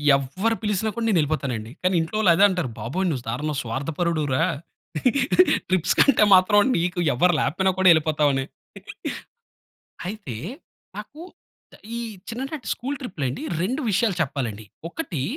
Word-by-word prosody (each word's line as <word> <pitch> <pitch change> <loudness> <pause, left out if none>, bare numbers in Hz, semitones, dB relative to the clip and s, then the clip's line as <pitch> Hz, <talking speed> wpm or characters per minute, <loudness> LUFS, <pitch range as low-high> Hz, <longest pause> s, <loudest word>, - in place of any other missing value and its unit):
ఎవ్వరు 185 - -1
పిలిసినా 210 +1 0
కూడా 235 -1 -2
నేను 200 -6 +3
వెళ్ళిపోతానండి. 130 -7 -2
కానీ 185 0 +2
ఇంట్లో 165 +6 -5
వాళ్ళు 190 -6 +5
అదే 200 - +4
అంటారు, 180 -9 -2
బాబోయ్ 145 - -2
నువ్వు 130 -6 -3
దారుణం 150 +5 -2
స్వార్థపరుడు 155 +7 -2
రా! 130 - +2 1.3
ట్రిప్స్‌కంటే 185 - +3
మాత్రం 205 +3 +5 0.2
నీకు 175 +1 -1
ఎవరు 175 +8 +3
లేకపోయినా 190 +7 +1
కూడా 190 - +4
వెళ్ళిపోతావని. 150 -4 +2 1.6
అయితే 190 - -6 0.6
నాకు 305 - -9 0.8
ఈ - - -3 0.3
చిన్ననాటి 265 +2 -5
స్కూల్ 275 +4 -4
ట్రిప్‌లండి 145 - -4 0.2
2 255 +10 -1
విషయాలు 195 0 +1
చెప్పాలండి, 120 -7 -4 0.2
ఒకటి 175 - -4
175 Hz, 125 wpm, -23 LUFS, 140-205 Hz, 1.6 s, వాళ్ళు